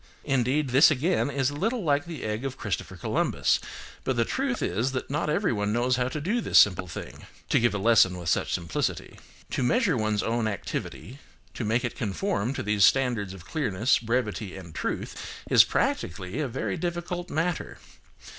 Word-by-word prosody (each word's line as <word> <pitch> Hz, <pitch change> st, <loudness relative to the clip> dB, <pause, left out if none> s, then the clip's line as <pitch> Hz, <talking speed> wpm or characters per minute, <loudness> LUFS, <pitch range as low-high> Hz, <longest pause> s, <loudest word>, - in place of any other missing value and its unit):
Indeed, 135 Hz, +1 st, +1 dB
this 135 Hz, +5 st, +7 dB
again 155 Hz, +2 st, +1 dB
is 135 Hz, -1 st, 0 dB
a -, -, -7 dB
little 225 Hz, -, -1 dB
like 145 Hz, 0 st, +1 dB
the 170 Hz, -3 st, -7 dB
egg 110 Hz, +2 st, -3 dB
of 135 Hz, -1 st, -4 dB
Christopher 105 Hz, -4 st, -4 dB
Columbus, -, -, +1 dB, 0.4 s
but 130 Hz, -, 0 dB
the 115 Hz, -1 st, +2 dB
truth 265 Hz, -2 st, -1 dB
is 125 Hz, +6 st, 0 dB
that 130 Hz, +1 st, -4 dB
not 150 Hz, +1 st, -1 dB
everyone 120 Hz, -, 0 dB
knows 125 Hz, +2 st, +1 dB
how 125 Hz, 0 st, +1 dB
to 140 Hz, +4 st, -4 dB
do 210 Hz, +11 st, 0 dB
this -, -, +2 dB
simple 90 Hz, -2 st, +5 dB
thing 75 Hz, -, -9 dB, 0.2 s
(to -, -, +4 dB
give 120 Hz, -2 st, +2 dB
a -, -, +1 dB
lesson 100 Hz, -3 st, +4 dB
with 85 Hz, -2 st, -7 dB
such -, -, +1 dB
simplicity). 85 Hz, -2 st, -2 dB, 0.3 s
To -, -, -1 dB
measure 185 Hz, -, +2 dB
one's 110 Hz, -2 st, 0 dB
own 115 Hz, -1 st, 0 dB
activity, 105 Hz, -, -5 dB, 0.3 s
to -, -, -4 dB
make 115 Hz, +4 st, +1 dB
it 120 Hz, -, -4 dB
conform 120 Hz, -, -1 dB
to -, -, -3 dB
these 105 Hz, -1 st, +2 dB
standards 120 Hz, -3 st, +3 dB
of 90 Hz, -2 st, -13 dB
clearness, 120 Hz, -, +1 dB
brevity 115 Hz, -4 st, -2 dB
and 85 Hz, -4 st, -10 dB
truth, -, -, -5 dB
is -, -, +9 dB
practically 90 Hz, -, -2 dB
a 150 Hz, -, 0 dB
very 115 Hz, -5 st, -3 dB
difficult 175 Hz, 0 st, -3 dB
matter. 165 Hz, +2 st, -2 dB
125 Hz, 185 wpm, -27 LUFS, 105-150 Hz, 0.4 s, is